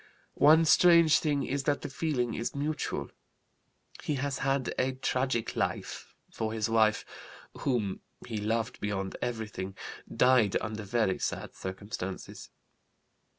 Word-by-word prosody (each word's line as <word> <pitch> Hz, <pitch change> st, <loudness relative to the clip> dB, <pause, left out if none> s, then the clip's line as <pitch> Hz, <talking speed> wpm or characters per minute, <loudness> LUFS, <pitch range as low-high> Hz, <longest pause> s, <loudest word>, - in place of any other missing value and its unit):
One 155 Hz, +3 st, +7 dB
strange 170 Hz, -1 st, +6 dB
thing 145 Hz, -3 st, 0 dB
is 140 Hz, +1 st, -2 dB
that 145 Hz, -1 st, +1 dB
the -, -, -4 dB
feeling 135 Hz, -5 st, -1 dB
is 115 Hz, -, -3 dB
mutual. 150 Hz, +2 st, -2 dB, 0.9 s
He 150 Hz, -, -1 dB
has 135 Hz, 0 st, -2 dB
had 135 Hz, -1 st, 0 dB
a 130 Hz, +1 st, +1 dB
tragic 130 Hz, -2 st, -1 dB
life, -, -, -3 dB, 0.2 s
for 110 Hz, -1 st, -3 dB
his 110 Hz, -2 st, 0 dB
wife, 110 Hz, -1 st, +3 dB, 0.5 s
whom 110 Hz, -8 st, -1 dB, 0.3 s
he 110 Hz, -, -4 dB
loved 110 Hz, +2 st, -1 dB
beyond 95 Hz, -2 st, -3 dB
everything, 105 Hz, -5 st, -4 dB, 0.4 s
died 125 Hz, -5 st, +4 dB
under 110 Hz, 0 st, -4 dB
very 105 Hz, -2 st, 0 dB
sad -, -, -3 dB
circumstances. 95 Hz, 0 st, -6 dB
120 Hz, 125 wpm, -30 LUFS, 110-140 Hz, 0.9 s, One